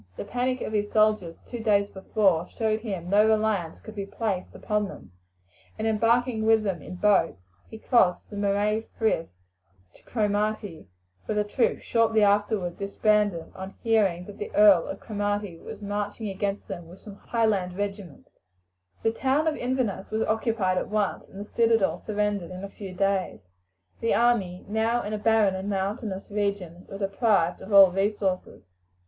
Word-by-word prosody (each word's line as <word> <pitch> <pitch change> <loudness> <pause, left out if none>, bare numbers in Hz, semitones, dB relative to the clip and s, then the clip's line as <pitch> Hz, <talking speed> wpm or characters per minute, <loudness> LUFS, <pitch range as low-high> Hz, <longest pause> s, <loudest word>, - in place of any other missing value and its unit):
The - - -5
panic 250 +3 -1
of - - -4
his 205 -1 -1
soldiers 215 -6 +2
two 240 - -7
days 205 -2 +2
before 190 -3 +1
showed 220 -1 -1
him 200 -6 -4
that - - +3
no - - +3
reliance 215 -6 +1
could 220 - -11
be 200 -2 -5
placed 200 -3 -3
upon 210 -1 -1
them, 95 - -12 0.7
and - - -3
embarking 230 +1 +2
with 220 0 +4
them 190 -6 -2
in 180 - -8
boats 190 - +2 0.3
he 220 - -9
crossed 220 -6 +2
the - - -7
Moray 205 +2 0
Frith 220 -7 0 0.6
to - - -21
Cromarty, 210 - -2 0.4
where 215 - -1
the 210 - +2
troops 210 +4 0
shortly 225 -2 +2
afterwards 205 -3 +1
disbanded 205 -2 +1
upon 190 +3 -10
hearing 200 -6 +2
that 205 0 -11
the 205 - -4
Earl 205 -5 +6
of 195 - -6
Cromarty 205 -4 -3
was - - -9
marching 205 +1 -3
against 200 +1 -3
them 175 -4 -7
with 180 +3 -13
some 205 -2 -11
Highland 200 -7 0
regiments. 200 -6 -6 0.6
The 225 - +3
town 270 +6 +1
of 310 - +1
Inverness 245 -7 -2
was 220 +1 0
occupied 220 -4 0
at - - -5
once, 210 -2 -1
and 195 - -12
the 205 - -5
citadel 225 -3 +2
surrendered 205 -4 -2
in 185 +1 -8
a 200 - -5
few 195 -1 -9
days. 190 - -1 0.5
The 230 - +1
army, 210 -7 +1
now 225 +3 0
in 210 - -4
a 215 - -2
barren 215 -2 +3
and 190 +2 -4
mountainous 195 0 -3
region, 200 -4 -3
were 195 - -6
deprived 195 -3 +1
of 205 - -9
all 195 -2 +8
resources. 195 -1 -1
205 Hz, 170 wpm, -26 LUFS, 195-220 Hz, 0.7 s, all